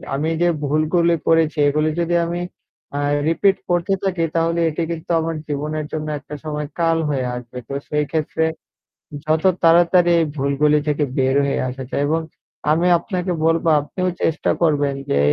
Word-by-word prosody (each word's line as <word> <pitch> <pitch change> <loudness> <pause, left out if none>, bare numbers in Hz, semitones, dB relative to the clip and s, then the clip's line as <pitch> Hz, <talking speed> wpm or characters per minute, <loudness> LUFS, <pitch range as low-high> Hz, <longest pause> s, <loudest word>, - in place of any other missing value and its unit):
আমি 150 +3 -1
যে 175 - +4 0.2
ভুলগুলো 155 +4 +2
করেছি 165 -1 +3
এগুলো 155 +2 +1
যদি 170 0 0
আমি 175 +1 -3 0.6
আ - - -1 0.3
রিপিট 190 +4 +3
করতে 175 +2 +1
থাকি 185 -3 0
তাহলে 165 +1 +1
এটি 160 +2 -2
কিন্তু 165 0 -5
আমার 165 0 -2
জীবনের 150 +1 -3
জন্য 155 -1 -3
একটা 150 +1 -9
সময় 150 -1 -4
কাল 165 -1 +2
হয়ে 135 -3 -1
আসবে। 125 0 -9
তো - - -4 0.2
সেই 150 0 0
ক্ষেত্রে 160 0 0 0.8
যত 155 +1 +1 0.2
তাড়াতাড়ি 175 +1 +5
এই 165 - +2
ভুলগুলি 145 +2 +2
থেকে 150 0 +1
বের 130 0 +2
হয়ে 140 - -1
আসা 130 +1 -6
যায়। 140 - 0
এবং 160 +2 +1 0.5
আমি 170 +3 +2
আপনাকে 180 -1 -3
বলবো 165 0 +2
আপনিও 185 +5 -2
চেষ্টা 160 - +1
করবেন 145 -3 +2
যে 70 - +2
160 Hz, 165 wpm, -20 LUFS, 150-170 Hz, 0.8 s, তাড়াতাড়ি